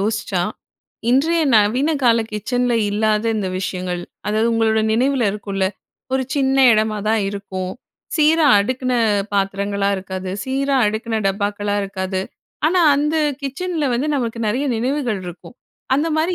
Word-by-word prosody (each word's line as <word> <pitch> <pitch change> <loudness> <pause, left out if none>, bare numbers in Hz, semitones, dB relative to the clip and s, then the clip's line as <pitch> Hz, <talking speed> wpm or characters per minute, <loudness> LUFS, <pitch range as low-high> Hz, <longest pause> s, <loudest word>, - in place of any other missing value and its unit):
யோசிச்சா, 205 -3 -1 0.7
இன்றைய 320 +6 +3 0.2
நவீனகால 245 +3 +3
கிச்சன்ல 245 +3 0 0.2
இல்லாத 215 +1 +1
இந்த 195 -3 -2
விஷயங்கள். 180 -1 -3 0.2
அதாவது 215 +2 +1
உங்களோட 220 -1 +2
நினைவுல 250 0 +2
இருக்கும்ல. 200 -2 -2 0.5
ஒரு 265 - +2
சின்ன 270 -2 +1 0.2
இடமா 215 -1 +1
தான் 220 -1 +2
இருக்கும். 190 -2 -5 0.5
சீரா 315 0 +4
அடுக்குன 255 +4 -1 0.4
பாத்திரங்களா 200 0 0
இருக்காது. 190 -1 -5
சீரா 275 +1 0
அடுக்குன 220 +1 -2
டப்பாக்களா 205 +1 -1
இருக்காது. 190 -1 -3 0.5
ஆனா 360 +3 +3 0.2
அந்த 300 +2 0 0.3
கிச்சன்ல 310 +4 -3
வந்து 265 +6 -1
நமக்கு 235 -3 -2
நெறைய 245 +7 0
நினைவுகள் 245 -3 -1
இருக்கும். 175 +7 -10 0.4
அந்த 295 +4 +1
மாரி 330 +4 +1
220 Hz, 125 wpm, -20 LUFS, 200-270 Hz, 0.7 s, சீரா